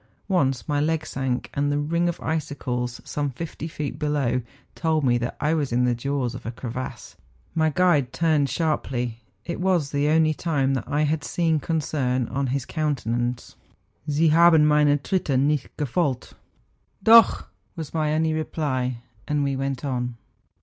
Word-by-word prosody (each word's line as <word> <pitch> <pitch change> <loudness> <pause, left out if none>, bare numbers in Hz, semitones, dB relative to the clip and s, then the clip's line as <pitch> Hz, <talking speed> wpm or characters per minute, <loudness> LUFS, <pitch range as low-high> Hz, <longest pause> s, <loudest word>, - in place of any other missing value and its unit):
Once 135 - +1
my 145 -2 +1
leg 160 +1 0
sank, 130 -2 -3
and 145 +1 0
the 145 - +1
ring 170 +4 +1
of 170 - -4
icicles, 130 -6 -3
some 145 -1 -2
fifty 160 +4 -6
feet 150 -3 -5
below, 140 -5 0 0.3
told 160 -2 0
me 125 -2 +3
that 120 +1 -4
I 150 +1 +1
was 150 -5 -1
in 125 +1 +2
the 125 - +2
jaws 125 0 -2
of 125 - -8
a - - -4
crevasse; 125 +1 -6 0.4
my 160 -1 +2
guide 150 -6 +2
turned 155 -3 +2
sharply—it 120 - -3
was 180 -6 +1
the 145 0 +1
only 155 0 +3
time 145 -4 0
that 130 -4 -3
I 150 +1 +1
liad 150 0 -1
seen 165 -3 +1
concern 135 -5 -1
on 135 +1 -1
bis 135 -2 -1
countenance,— 125 -6 -2 0.3
' - - -37
Sie 155 +3 +3
haben 165 -1 +6
meine 150 -1 +4
Tritte 145 -3 0
nicht 145 0 +1
gefolgt.^ 145 -2 -1 0.4
' - - -38
Dock 225 -1 +6
/' - - -43
was 160 -4 -7
my 155 -2 0
only 160 0 +1
reply, 130 -6 -2 0.2
and 150 -1 +1
we 140 -1 0
went 135 0 -3
on. 125 -3 -2
145 Hz, 170 wpm, -24 LUFS, 130-160 Hz, 0.4 s, haben